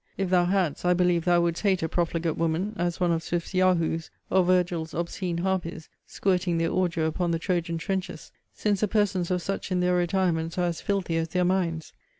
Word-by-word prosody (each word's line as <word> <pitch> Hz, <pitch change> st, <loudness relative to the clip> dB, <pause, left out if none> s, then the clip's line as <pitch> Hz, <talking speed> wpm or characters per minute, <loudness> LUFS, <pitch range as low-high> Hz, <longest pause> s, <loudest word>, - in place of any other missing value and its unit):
If 195 Hz, -2 st, -1 dB
thou 180 Hz, -1 st, +4 dB
hadst, 180 Hz, -4 st, 0 dB
I 180 Hz, 0 st, +3 dB
believe 175 Hz, -2 st, +2 dB
thou 175 Hz, -1 st, +4 dB
wouldst 170 Hz, -1 st, 0 dB
hate 190 Hz, -4 st, +2 dB
a -, -, +1 dB
profligate 165 Hz, -1 st, -1 dB
woman, 165 Hz, +6 st, -1 dB
as 175 Hz, -3 st, -2 dB
one 175 Hz, -1 st, +2 dB
of 165 Hz, -1 st, 0 dB
Swift's 170 Hz, +2 st, -3 dB
yahoos, 170 Hz, -3 st, +1 dB, 0.2 s
or 190 Hz, 0 st, +4 dB
Virgil's 175 Hz, -3 st, +1 dB
obscene 170 Hz, +1 st, -3 dB
harpies, 175 Hz, -3 st, -2 dB, 0.2 s
squirting 180 Hz, -3 st, 0 dB
their 165 Hz, 0 st, 0 dB
ordure 175 Hz, -3 st, 0 dB
upon 170 Hz, +2 st, -1 dB
the 165 Hz, -, +1 dB
Trojan 170 Hz, -1 st, -1 dB
trenches; 190 Hz, +2 st, -4 dB, 0.2 s
since 205 Hz, -2 st, 0 dB
the 215 Hz, -, +3 dB
persons 195 Hz, -4 st, +1 dB
of 180 Hz, -1 st, -1 dB
such 195 Hz, 0 st, -4 dB
in 180 Hz, -, +1 dB
their 180 Hz, 0 st, +2 dB
retirements 175 Hz, -2 st, 0 dB
are 180 Hz, -, +2 dB
as 170 Hz, -2 st, -2 dB
filthy 195 Hz, -5 st, -1 dB
as 165 Hz, 0 st, 0 dB
their 180 Hz, +2 st, 0 dB
minds. 170 Hz, -4 st, -1 dB
175 Hz, 200 wpm, -26 LUFS, 165-185 Hz, 0.2 s, thou